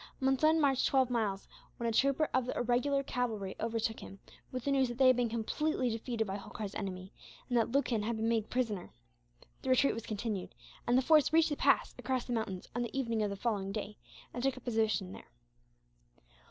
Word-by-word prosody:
Monson 270 +5 +3
marched 275 -3 +3
twelve 260 -2 +2
miles 210 -5 -1 0.3
when 235 - -2
a - - +1
trooper 275 +6 +2
of 255 -1 +1
the - - -3
irregular 250 +4 +1
cavalry 220 -7 -2
overtook 225 0 -1
him, 195 - -10 0.3
with 255 -2 -4
the 280 - 0
news 270 -2 +3
that 240 0 -6
they 265 - +4
had 255 0 +7
been 245 -1 +1
completely 250 +3 -1
defeated 225 0 -2
by 195 -1 -3
Holkar's 205 0 -7
army, 190 -2 -5 0.3
and 245 - -1
that 230 -2 +3
Lucan 255 -5 +1
had 225 +2 -1
been 220 +1 -1
made 225 -2 0
prisoner. 225 -7 -2 0.7
The 265 - -4
retreat 260 +2 +4
was 230 - -6
continued, 210 -3 -4 0.3
and 240 +1 +4
the 260 - +3
force 305 0 +5
reached 325 0 +4
the 295 - -1
pass - - +2
across 260 -2 -1
the 245 - -3
mountains 200 -5 -3
on 240 - 0
the 240 +2 -4
evening 230 -4 0
of 210 - +1
the 200 - -4
following 200 -2 -2
day, 210 0 -5 0.3
and 245 - -4
took 270 +1 +2
up 255 - -11
a - - -30
position 220 -6 0
there. - - -11
235 Hz, 210 wpm, -32 LUFS, 215-260 Hz, 0.7 s, had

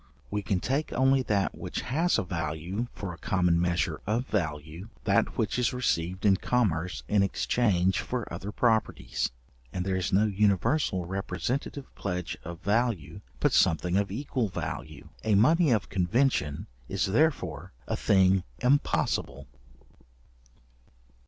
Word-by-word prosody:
We 105 0 -1
can 95 -1 0
take 135 +9 -1
only 135 +1 +4
that 105 -5 0
which - - -4
has 165 +7 +1
a - - 0
value 85 +5 -3
for 95 -4 -6
a 85 - -12
common 90 -3 +2
measure 85 0 0
of 115 +4 0
value, 80 - -3
that 100 -2 +1
which 110 +1 0
is 125 - +1
received 95 -6 -1
in 100 -2 +5
commerce 90 -8 0
in 105 -1 +3
exchange 95 -1 +1
for 125 -3 -3
other 100 - -5
properties; 110 -1 0 0.4
and 90 0 -3
there 95 -1 0
is 90 -2 -1
no 100 +3 +4
universal 100 - +1
representative 125 +9 -3
pledge 90 -4 -3
of 85 0 -8
value, 105 - 0 0.2
but - - +2
something 90 0 +3
of 100 0 +1
equal 125 -1 -2
value. 75 -4 -6
A 110 -2 +3
money 155 - +5
of 110 -5 +2
convention 90 - +1 0.2
is 95 0 0
therefore 100 - 0 0.2
a - - -1
thing 95 -1 +3
impossible. 125 - +1
100 Hz, 140 wpm, -28 LUFS, 90-120 Hz, 0.4 s, in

